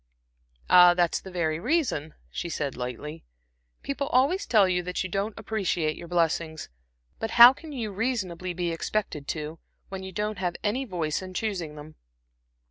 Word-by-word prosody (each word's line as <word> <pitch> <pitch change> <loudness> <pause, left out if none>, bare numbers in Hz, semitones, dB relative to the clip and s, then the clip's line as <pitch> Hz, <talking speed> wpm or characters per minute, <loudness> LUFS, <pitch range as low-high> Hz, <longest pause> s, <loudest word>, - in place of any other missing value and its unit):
"Ah, 180 0 +8
that's 175 -2 +1
the 190 - -10
very 165 -3 -1
reason," 190 - 0 0.2
she 120 - -4
said, 145 -4 -3
lightly. 130 +6 -6 0.6
"People 280 0 -2
always 285 +11 +2
tell 210 -5 +5
you 180 -1 +1
that 180 +1 -3
you 185 - -5
don't 200 +3 -2
appreciate 195 -8 -1
your 170 - -9
blessings; 165 - -1 0.5
but 225 - -2
how 240 +2 +11
can 315 +3 -11
you 230 -7 -4
reasonably 190 -5 -2
be 175 -1 -2
expected 165 -4 -3
to, 155 +1 -4 0.3
when 190 -1 -6
you 190 0 -7
don't 210 +1 -3
have 180 -2 -1
any 245 +6 0
voice 170 -7 -2
in 185 -1 -9
choosing 180 -8 -3
them?" 150 +1 -11
180 Hz, 165 wpm, -27 LUFS, 160-215 Hz, 0.6 s, how